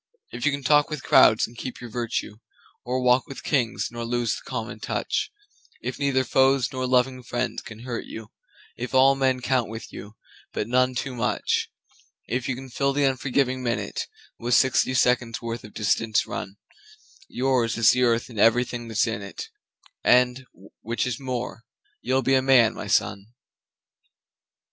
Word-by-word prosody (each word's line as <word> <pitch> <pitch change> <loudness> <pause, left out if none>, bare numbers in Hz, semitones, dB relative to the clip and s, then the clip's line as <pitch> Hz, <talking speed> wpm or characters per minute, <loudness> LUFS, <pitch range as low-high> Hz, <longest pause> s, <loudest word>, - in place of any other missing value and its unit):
If 120 +3 -2
you - - +4
can 140 -1 -4
talk 150 +2 +4
with 150 -4 -5
crowds 110 - +5
and 120 - -13
keep 125 +2 -7
your 120 -2 -9
virtue, 115 -3 -3 0.5
Or 125 +1 -2
walk 125 0 +3
with 135 - -9
Kings 125 -5 0
nor 120 0 -5
lose 120 -1 0
the - - -11
common 115 -3 -5
touch, - - -2 0.5
If - - -5
neither 140 -2 +2
foes 135 +1 +3
nor 130 0 -2
loving 130 0 +2
friends 120 0 -3
can 110 0 -11
hurt 120 -1 -5
you, 110 -1 -9 0.5
If 125 +2 -5
all 135 +1 +6
men 130 -2 +1
count 125 -3 0
with 110 +1 -8
you, 105 +1 -10 0.4
but 105 - -2
none 125 +1 +2
too 130 +1 -3
much; 120 - -1 0.6
If 125 +2 -2
you 130 - 0
can 130 0 -10
fill 140 +2 0
the 145 +1 +1
unforgiving 130 -1 0
minute 120 -2 -2 0.3
With 120 +1 +1
sixty 130 0 +3
seconds' 125 -3 +2
worth 115 0 -5
of 105 - -13
distance 110 +1 +1
run, 95 +1 -6 0.7
Yours 125 -4 0
is 115 0 +6
the 125 - +1
Earth 115 -2 +2
and 115 -4 -8
everything 120 +2 +2
that's 110 -2 +1
in 110 -3 -3
it, 100 - -8 0.5
And 125 +1 +3 0.3
which 115 +3 -2
is 125 -2 -3
more 125 -3 -4 0.4
you'll 130 +1 +1
be 135 - +2
a 130 - +4
Man, 130 -4 +5
my - - -7
son! 100 +1 0
125 Hz, 170 wpm, -25 LUFS, 115-130 Hz, 0.7 s, all